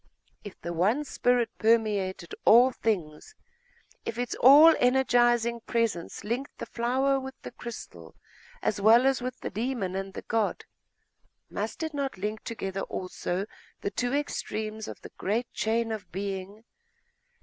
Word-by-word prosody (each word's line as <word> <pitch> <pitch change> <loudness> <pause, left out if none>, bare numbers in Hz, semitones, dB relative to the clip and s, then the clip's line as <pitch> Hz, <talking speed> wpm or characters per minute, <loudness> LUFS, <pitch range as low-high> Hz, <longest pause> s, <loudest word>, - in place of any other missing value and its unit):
If 205 - -10
the 170 - -5
one 205 - +2
spirit 245 -4 +1
permeated 210 -6 +1
all 245 +3 +7
things, 195 - -3 0.7
if 225 - -5
its 245 -1 -2
all 295 +6 +9
energising 240 -2 +3
presence 230 -9 -1
linked 240 +6 -4
the - - -5
flower 265 +3 +1
with 265 0 -8
the - - -7
crystal 85 - -9 0.5
as 200 - 0
well 230 +5 +6
as 270 -1 +2
with 255 +1 -5
the - - -4
demon 220 -3 -2
and 195 0 -5
the - - -6
god, 220 -2 -1 0.9
must - - -4
it 315 -1 -3
not 280 -5 -3
link 210 +3 -4
together 195 -4 -4
also 185 0 -3 0.4
the 200 - -2
two 245 +4 -1
extremes 220 -6 -3
of - - -8
the - - -11
great 225 +5 -1
chain 225 +1 0
of 215 -2 -6
being? 195 +2 -5
225 Hz, 145 wpm, -28 LUFS, 200-250 Hz, 0.9 s, all